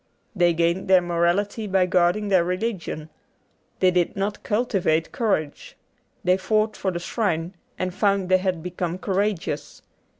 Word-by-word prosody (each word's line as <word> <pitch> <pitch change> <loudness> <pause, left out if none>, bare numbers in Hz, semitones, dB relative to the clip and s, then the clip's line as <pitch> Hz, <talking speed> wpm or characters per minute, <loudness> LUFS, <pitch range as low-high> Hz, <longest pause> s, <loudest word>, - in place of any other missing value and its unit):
They 175 -2 +3
gained 170 +3 +1
their 190 -1 +6
morality 175 +5 0
by 190 -1 +3
guarding 180 +3 +2
their 185 -3 +4
religion. 180 -4 -3 0.7
They 185 - +5
did 180 -1 +1
not 200 +1 -2
cultivate 195 -8 0
courage. 195 - -2 0.5
They 180 +1 +3
fought 215 +3 0
for 190 - -2
the 175 - -3
shrine, 175 -2 -2 0.2
and 185 -1 -2
found 200 -1 +1
they 185 0 +4
had 185 -3 -2
become 180 -1 -3
courageous. 195 -1 -2
185 Hz, 140 wpm, -24 LUFS, 175-200 Hz, 0.7 s, their